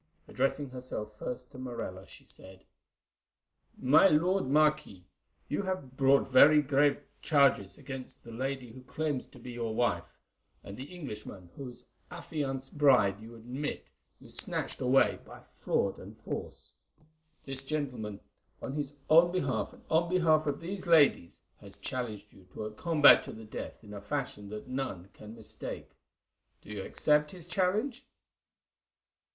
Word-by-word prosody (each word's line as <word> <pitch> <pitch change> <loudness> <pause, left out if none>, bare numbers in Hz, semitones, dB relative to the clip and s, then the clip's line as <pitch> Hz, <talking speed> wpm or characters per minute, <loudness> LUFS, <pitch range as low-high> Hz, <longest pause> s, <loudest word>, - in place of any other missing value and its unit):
Addressing 135 +1 -1
herself 125 -4 -6
first 125 +1 -6
to 130 - -11
Morella, 115 -7 -6
she - - -13
said: 95 0 -14 1.1
"My 135 +8 +6
lord 180 +2 +2
Marquis, 150 -10 +2 0.4
you 150 - -1
have 185 -10 -4
brought 135 0 +3
very 150 +4 +8
grave 145 +1 +2 0.2
charges 140 -10 +3
against 135 -2 -9
the 115 - -11
lady 130 0 -4
who 130 - -11
claims 145 +1 -3
to - - -17
be 125 +1 -9
your 115 -2 -3
wife, 120 - -1 0.5
and 100 - -8
the 130 - -7
Englishman 105 - -8
whose 125 -3 -9 0.2
affianced 145 -5 -5
bride 125 -9 +5
you 115 +1 -11
admit 125 +6 -5 0.3
you - - -14
snatched - - -2
away 130 +1 +3
by - - -13 0.2
fraud - - 0
and - - -12
force. - - -6 0.7
This 135 -1 -4
gentleman, 130 -8 -4 0.4
on 130 - -5
his 145 -1 -3
own 170 +2 +6
behalf 140 -8 -1
and - - -18
on 165 +2 +2
behalf 160 -4 +3
of 145 +1 -1
these 185 +2 -5
ladies, 145 - +4 0.2
has 100 -1 -12
challenged 110 -5 -5
you 95 -2 -18
to - - -4
a 110 - -5
combat 150 +6 +6
to - - -7
the 110 0 -10
death 110 - -7
in 105 -1 -11
a 100 - -7
fashion 105 -4 -4
that 105 +2 -7
none 130 -9 -4
can 105 +1 -11
mistake. 110 -2 -7 0.7
Do - - -11
you 105 -2 -4
accept 150 +6 +2
his 175 -2 -10
challenge?" 210 +9 0
135 Hz, 150 wpm, -31 LUFS, 110-150 Hz, 1.1 s, very